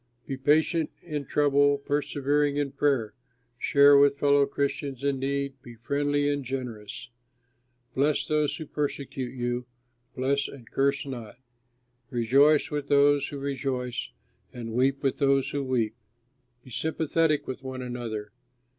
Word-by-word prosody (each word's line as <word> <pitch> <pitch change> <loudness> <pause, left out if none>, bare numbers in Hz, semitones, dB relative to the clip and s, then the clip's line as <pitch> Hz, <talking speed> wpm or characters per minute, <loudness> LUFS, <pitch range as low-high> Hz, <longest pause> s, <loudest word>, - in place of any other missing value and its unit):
Be 135 - -4
patient 155 +4 +2
in 150 -4 -4
trouble, 145 -1 +3
persevering 145 0 0
in 145 -2 -1
prayer; 135 -8 0 0.5
share 140 +2 +6
with 140 0 +5
fellow 140 0 +4
Christians 140 -1 -3
in 140 -1 0
need, 140 0 -2
be 120 -2 -12
friendly 145 +4 0
and 145 -1 0
generous. 120 -4 -6 0.8
Bless 145 +2 +1
those 150 -2 +1
who 160 - -6
persecute 140 -3 -4
you, 120 0 -2 0.5
bless 140 +2 0
and 125 -5 -12
curse 140 +1 +1
not. 120 -5 -7 0.7
Rejoice 135 +6 +3
with 145 -1 -3
those 145 0 +4
who 145 - -6
rejoice, 130 -3 -3 0.4
and 115 -2 -7
weep 135 +3 +1
with 135 - 0
those 140 -1 +2
who 140 -1 -2
weep. 120 -5 0 0.7
Be 130 - -14
sympathetic 160 +3 0
with 130 +1 -6
one 130 -1 -6
another. 115 -4 -5
140 Hz, 135 wpm, -27 LUFS, 125-145 Hz, 0.8 s, share